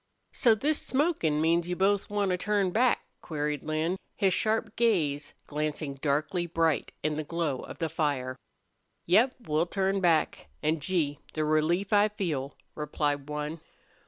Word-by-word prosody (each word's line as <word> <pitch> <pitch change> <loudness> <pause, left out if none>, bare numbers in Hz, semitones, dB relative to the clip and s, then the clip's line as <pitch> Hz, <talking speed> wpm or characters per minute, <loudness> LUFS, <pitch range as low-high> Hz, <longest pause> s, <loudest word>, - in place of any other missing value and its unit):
"So 230 -3 +4
this 290 +7 0
smokin' 260 - +1
means 170 +2 +2
you 180 - 0
both 195 +2 +2
want 205 -2 0
to - - +2
turn 200 -1 +1
back?" 245 +5 +2 0.2
queried 150 -2 -2
Lin, 155 +4 -1 0.2
his 195 -3 +2
sharp 220 0 0
gaze 160 -12 +1
glancing 150 -1 -3
darkly 150 +5 -1
bright 165 -2 +1
in 155 -1 0
the 155 - -1
glow 155 -4 -2
of - - -8
the 165 - -1
fire. 145 -5 -1 0.7
"Yep, 230 +9 +4
we'll 160 -2 0
turn 195 +1 0
back. 165 - +2 0.2
An', 155 +1 +1
Gee! 150 -3 -1 0.2
the 155 -1 0
relief 165 +6 +1
I 205 0 +6
feel!" 155 -10 -3 0.2
replied 145 -1 -2
one. 150 +2 -4
165 Hz, 155 wpm, -29 LUFS, 150-195 Hz, 0.7 s, I